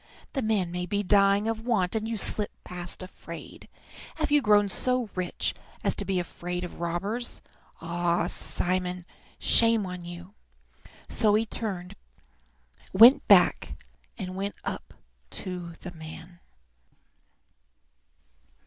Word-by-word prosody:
"The 270 - -1
man 210 -6 0
may 180 0 -3
be 205 +2 -1
dying 200 +1 +4
of 225 0 -2
want, 215 -7 +1
and 220 0 -1
you 225 -1 -2
slip 210 0 +2
past 180 +1 -7
afraid. 185 - -10 0.5
Have 310 -2 -2
you 295 0 +5
grown 210 -3 +4
so 250 +2 0
rich 185 -1 -2 0.3
as - - +3
to - - -5
be 190 -2 0
afraid 175 +1 -4
of 175 - -8
robbers? 195 +8 -1 0.4
Ah, 170 +1 0
Simon, 180 0 -1 0.3
shame 230 -3 +4
on 180 -1 -6
you!" 175 +2 -9 0.7
So 210 -2 +3
he 220 +1 +2
turned 195 -5 -3 1.3
back - - +4 0.4
and 185 -3 -5
went 200 +1 -3
up - - -6 0.3
to 180 -2 -5
the 180 - -7
man. 165 +1 -10
185 Hz, 120 wpm, -27 LUFS, 175-215 Hz, 1.3 s, you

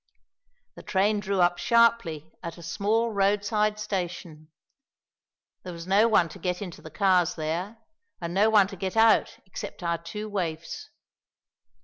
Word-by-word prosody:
The - - -12
train 205 +2 +1
drew 200 -2 -1
up 175 0 +2
sharply 230 - +2
at 170 -1 -7
a 170 - -11
small 215 +7 0
road 200 0 +1
side 210 0 +1
station. 175 -6 -5 1.1
There 180 - -8
was 170 0 -8
no 200 +4 +4
one 205 -6 +3
to - - -12
get 180 -1 -2
into 185 -5 -8
the 160 - -10
cars 180 0 +2
there, 170 +7 -3 0.4
and 170 0 -5
no 205 +4 +4
one 210 -3 +5
to 195 - -8
get 190 +3 -4
out 225 0 +4
except 190 -1 -8
our 170 -1 -1
two 210 +6 -6
waifs. 170 -6 -4
190 Hz, 155 wpm, -26 LUFS, 170-210 Hz, 1.1 s, one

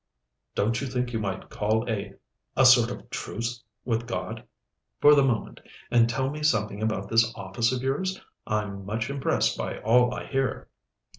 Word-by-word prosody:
"Don't 115 +5 +1
you 140 - -2
think 125 -1 -2
you 115 - 0
might 100 -3 -4
call 110 +3 0
a 100 -3 -3 0.4
a - - +6
sort - - +7
of - - -8
truce 115 +1 -4 0.2
of 115 0 -1
God, 115 - -4 0.6
for 150 - +8
the 140 -1 +5
moment, 120 -5 -1 0.3
and 115 -1 +5
tell 130 +3 -1
me 150 +1 -6
something 110 -8 +1
about 110 -3 -1
this 115 +1 +3
office 100 +5 -1
of 130 -1 -2
yours? 185 +9 -1 0.3
I'm 105 -2 -2
much 110 +6 -3
impressed 140 -1 0
by - - -3
all 125 +2 +4
I - - -5
hear." 135 -1 -2
115 Hz, 170 wpm, -26 LUFS, 105-130 Hz, 0.6 s, for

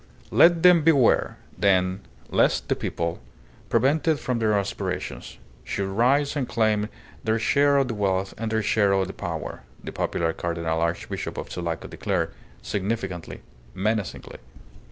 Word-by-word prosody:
"Let 170 0 +5
them 180 -2 +7
beware, 145 -6 +3 0.2
then, 95 -1 +2 0.3
lest - - +2
the - - +2
people, 85 0 -3 0.5
prevented 145 +6 +2
from 125 -2 -2
their 110 -2 +2
aspirations, 100 0 -4 0.3
should 95 +8 -3
rise 135 +9 +2
and 135 -4 -2
claim 110 -2 +1 0.3
their 110 0 +1
share 140 +4 +3
of 135 -2 +2
the 120 - -3
wealth 95 -2 -1
and 110 0 -4
their 110 -1 +1
share 100 -1 +3
of 95 -1 +2
the 95 - -7
power," 85 -5 -5 0.2
the - - -6
popular 80 -1 -1
Cardinal 85 -1 -2
Archbishop 85 0 -3
of - - -6
Sulaco 85 -2 -4
declared, - - -2 0.3
significantly, 95 -4 -3 0.3
menacingly. 105 +2 -2
105 Hz, 140 wpm, -25 LUFS, 95-125 Hz, 0.5 s, them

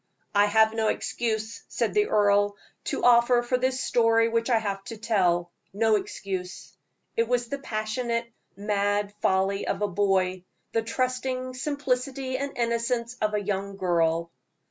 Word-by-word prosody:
"I 205 0 +5
have 220 +1 +4
no 225 -1 0
excuse," 220 0 -2
said - - -1
the 420 0 +3
earl, 205 -1 +3 0.3
"to - - -3
offer 240 0 +5
for 240 +1 0
this 260 +1 0
story 230 -1 +3
which 230 +1 0
I 235 - +4
have 200 -3 -3
to 225 - -7
tell 180 -6 +1 0.2
no 220 +1 +3
excuse. 190 -2 -5 0.4
It 230 0 +1
was 245 -1 0
the 280 - -3
passionate, 230 0 -2 0.3
mad 205 0 0
folly 195 +1 +1
of - - -1
a - - +2
boy 185 -1 +1 0.3
the 225 - +1
trusting 255 +2 -2
simplicity 260 -1 -2
and 280 0 -4
innocence 235 0 -1
of 215 0 +1
a 205 - -1
young 200 0 -3
girl." 170 -2 +1
220 Hz, 150 wpm, -26 LUFS, 200-240 Hz, 0.4 s, I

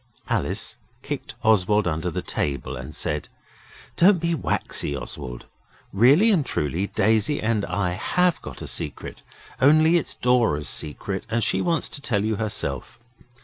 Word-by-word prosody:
Alice - - -1 0.3
kicked - - -5
Oswald 105 -1 +3
under 80 +1 -1
the 80 - -4
table 70 -1 -3
and 65 +5 -7
said - - -2 0.7
'Don't 185 +1 +6
be 170 +1 0
waxy, 75 - -1
Oswald. - - -7 0.5
Really 140 - +5
and 175 -8 +3
truly 85 - -1
Daisy 110 +9 +2
and 110 -2 0
I 100 -3 -1
HAVE 175 - +1
got - - -8
a - - -6
secret, - - -5 0.4
only 155 +5 +6
it's 150 - -4
Dora's 115 -12 +2
secret, 95 +7 -3
and 115 +1 +1
she - - +2
wants 170 -2 +1
to 140 - -7
tell 105 -7 0
you 110 -1 0
herself. 100 - -3
110 Hz, 145 wpm, -24 LUFS, 90-145 Hz, 0.7 s, Don't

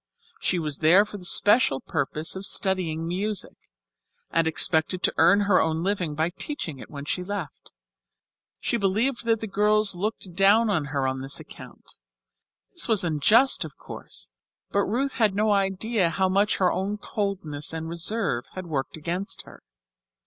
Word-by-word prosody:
She 180 - 0
was 150 -4 -2
there 175 +6 +6
for 205 -1 -9
the 180 - -11
special 205 - +3
purpose 155 +3 -2
of 190 - -6
studying 180 -5 +1
music, 195 +3 -2 0.8
and 165 -1 +2
expected 160 +2 +2
to - - +2
earn 175 +6 +5
her 200 -2 +3
own 160 +1 -1
living 180 -6 -1
by 160 +3 0
teaching 180 - -5
it - - -11
when 140 -1 -8
she 180 +4 -2
left. 190 -5 -6 0.9
She 235 - 0
believed 225 +6 0
that 225 -1 +1
the - - -2
girls 210 +1 +2
looked 190 0 -4
down 205 +4 +4
on 160 -7 0
her 140 -2 -2
on 130 0 -3
this 135 +1 -3
account; - - -13 0.7
this - - 0
was 215 -4 +3
unjust, 180 - +3
of - - -10
course, - - -9 0.4
but 200 - +1
Ruth 265 +6 -1
had 215 -5 +2
no 210 +1 +2
idea 195 0 +1
how 190 +3 +1
much 200 +3 +2
her 185 -2 +2
own 200 +2 -2
coldness 190 -9 -3
and 160 0 -5
reserve 170 - -1
had 185 -1 -6
worked 145 -3 -3
against 175 +6 -3
her. - - -15
190 Hz, 165 wpm, -25 LUFS, 160-205 Hz, 0.9 s, there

